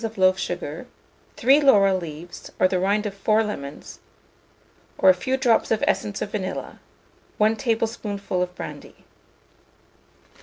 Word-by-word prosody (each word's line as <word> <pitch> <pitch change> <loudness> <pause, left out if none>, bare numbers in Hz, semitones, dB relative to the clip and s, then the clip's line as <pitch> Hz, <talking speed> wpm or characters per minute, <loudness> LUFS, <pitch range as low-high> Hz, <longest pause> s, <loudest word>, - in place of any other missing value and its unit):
of 225 -1 -4
loaf 185 0 +4
sugar, 175 +2 -5 0.5
3 270 +5 +5
laurel 200 -9 +5
leaves, 170 -1 -8
or 185 - +5
the 185 -1 -1
rind 200 +3 +1
of 205 - -3
4 215 +2 +2
lemon, 145 -9 -6 1.1
or 190 - +6
a - - +3
few 260 +8 -2
drops 245 -4 +2
of 220 - 0
essence 205 -1 -1
of 205 - -7
vanilla, 190 -3 -5 0.6
1 215 +1 +3
tablespoonful 220 -5 -2
of 180 0 -3
brandy. - - -9
200 Hz, 140 wpm, -23 LUFS, 185-225 Hz, 1.1 s, or